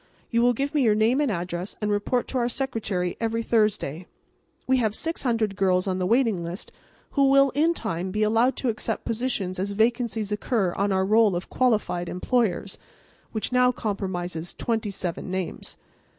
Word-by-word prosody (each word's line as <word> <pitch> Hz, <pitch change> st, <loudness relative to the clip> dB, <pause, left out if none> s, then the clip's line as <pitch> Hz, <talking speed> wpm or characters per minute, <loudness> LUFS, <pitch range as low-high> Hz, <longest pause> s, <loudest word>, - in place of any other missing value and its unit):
You 235 Hz, -1 st, +3 dB
will 245 Hz, +1 st, +4 dB
give 275 Hz, +5 st, -2 dB
me 295 Hz, -, +2 dB
your 220 Hz, -4 st, +4 dB
name 230 Hz, +6 st, +3 dB
and 285 Hz, -5 st, +1 dB
address 175 Hz, 0 st, -4 dB
and 210 Hz, -1 st, -1 dB
report 205 Hz, +4 st, 0 dB
to 260 Hz, -, -1 dB
our 240 Hz, 0 st, +1 dB
secretary 220 Hz, -9 st, -2 dB
every 230 Hz, 0 st, 0 dB
Thursday. 205 Hz, -8 st, 0 dB, 0.6 s
We 260 Hz, 0 st, +3 dB
have 220 Hz, -4 st, 0 dB
600 230 Hz, -10 st, -1 dB
girls 185 Hz, -1 st, +2 dB
on 185 Hz, -1 st, -1 dB
the 180 Hz, -, 0 dB
waiting 225 Hz, -6 st, +2 dB
list 170 Hz, +3 st, -6 dB, 0.4 s
who 275 Hz, -1 st, +3 dB
will 275 Hz, 0 st, +5 dB
in 320 Hz, +5 st, +2 dB
time 175 Hz, -, -3 dB
be 210 Hz, +3 st, 0 dB
allowed 225 Hz, +4 st, +3 dB
to 255 Hz, -, -1 dB
accept 220 Hz, -, -3 dB
positions 220 Hz, -6 st, -2 dB
as 200 Hz, +2 st, -2 dB
vacancies 225 Hz, -1 st, 0 dB
occur 210 Hz, -3 st, 0 dB
on 200 Hz, +1 st, 0 dB
our 190 Hz, 0 st, +2 dB
roll 215 Hz, -1 st, +4 dB
of 175 Hz, -, -5 dB
Qualified 210 Hz, -8 st, +1 dB
Employers, 200 Hz, -1 st, 0 dB, 0.5 s
which 220 Hz, +2 st, -3 dB
now 250 Hz, 0 st, +4 dB
comprises 180 Hz, -7 st, -4 dB
twenty 225 Hz, -2 st, -1 dB
seven 185 Hz, -2 st, -4 dB
names. 185 Hz, -2 st, -5 dB
215 Hz, 175 wpm, -25 LUFS, 185-245 Hz, 0.6 s, will